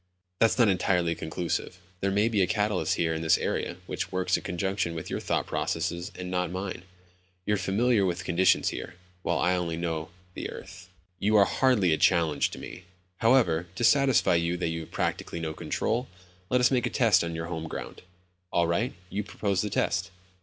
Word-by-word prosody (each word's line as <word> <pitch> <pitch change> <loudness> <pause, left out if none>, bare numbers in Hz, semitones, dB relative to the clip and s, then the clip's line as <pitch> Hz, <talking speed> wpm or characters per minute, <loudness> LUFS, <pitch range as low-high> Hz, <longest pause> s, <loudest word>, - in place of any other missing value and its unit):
"That's 115 +1 +4
not 120 -3 +5
entirely 90 -3 +2
conclusive. 85 +2 -3 0.2
There 100 - 0
may 100 +3 +2
be 110 -4 +1
a 90 - +3
catalyst 105 0 0
here 80 -1 0
in 80 - -3
this 80 -1 +4
area 85 - -2
which 90 0 -4
works 95 0 +1
in - - -2
conjunction 95 -1 -2
with 80 - -6
your - - -1
thought - - -1
processes 85 +3 -2
and 90 0 -6
not 90 -1 0
mine. 95 +1 -5 0.6
You're 105 0 +1
familiar 100 +4 +2
with 90 0 -1
conditions 90 +1 +3
here, 90 - -6 0.3
while - - 0
I 90 +2 +2
only 85 -2 -2
know 80 -2 -3 0.2
the - - -5
earth." 95 -1 -10 0.3
"You 105 +2 +2
are 100 -1 +7
hardly 105 -11 +3
a - - +1
challenge 80 -5 +3
to - - -9
me. 90 - -9 0.3
However, 95 -9 +3
to 120 - -3
satisfy 135 -3 +4
you 85 +1 +1
that 85 - -1
you 80 0 -3
have 80 - -9
practically 85 - -2
no 80 -1 -3
control, 120 +9 -2 0.4
let 125 - +3
us 125 - +4
make 125 -2 +2
a - - -2
test 110 -9 +4
on 85 -1 -4
your 80 0 -3
home 80 -1 -4
ground." - - -7 0.5
"All 85 - +3
right. 100 +9 0 0.2
You 105 +2 -2
propose 100 -1 -1
the 105 - -2
test." 90 -2 0
90 Hz, 195 wpm, -28 LUFS, 85-105 Hz, 0.6 s, are